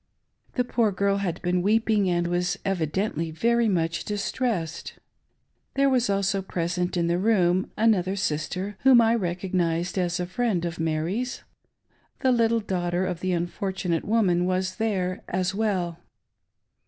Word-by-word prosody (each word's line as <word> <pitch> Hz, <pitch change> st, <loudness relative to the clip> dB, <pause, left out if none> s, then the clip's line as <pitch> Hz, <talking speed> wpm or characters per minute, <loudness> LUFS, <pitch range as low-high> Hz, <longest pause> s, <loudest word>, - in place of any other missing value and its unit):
The 250 Hz, -, +1 dB
poor 235 Hz, -3 st, +1 dB
girl 200 Hz, +1 st, +1 dB
had 180 Hz, -4 st, -2 dB
been 180 Hz, 0 st, +1 dB
weeping, 215 Hz, 0 st, +2 dB
and 175 Hz, -1 st, +1 dB
was 175 Hz, +1 st, 0 dB
evidently 170 Hz, -1 st, -1 dB
very 235 Hz, +7 st, +2 dB
much 170 Hz, -3 st, 0 dB
dis 205 Hz, -1 st, -3 dB
tressed. 210 Hz, -11 st, -2 dB, 0.8 s
There 275 Hz, 0 st, +3 dB
was 250 Hz, -4 st, +2 dB
also 195 Hz, 0 st, +1 dB
present 180 Hz, 0 st, -2 dB
in 170 Hz, -, +1 dB
the 170 Hz, +1 st, +1 dB
room 185 Hz, -3 st, +2 dB
another 195 Hz, -4 st, +2 dB
sister, 185 Hz, +3 st, -2 dB
whom 260 Hz, -2 st, +6 dB
I 230 Hz, 0 st, +4 dB
recognised 180 Hz, -3 st, -1 dB
as 180 Hz, -1 st, 0 dB
a 180 Hz, -, -1 dB
friend 185 Hz, -2 st, -1 dB
of 170 Hz, 0 st, -4 dB
Mary's. 165 Hz, +10 st, -2 dB, 0.8 s
The 260 Hz, -, +3 dB
little 230 Hz, -1 st, +2 dB
daughter 180 Hz, -2 st, -1 dB
of 175 Hz, -2 st, -3 dB
the 185 Hz, +1 st, -1 dB
unfortunate 175 Hz, 0 st, -2 dB
woman 190 Hz, -6 st, +2 dB
was 185 Hz, 0 st, -1 dB
there 190 Hz, -5 st, -1 dB
as 185 Hz, +1 st, -1 dB
well. 190 Hz, -5 st, -1 dB
185 Hz, 145 wpm, -25 LUFS, 175-215 Hz, 0.8 s, whom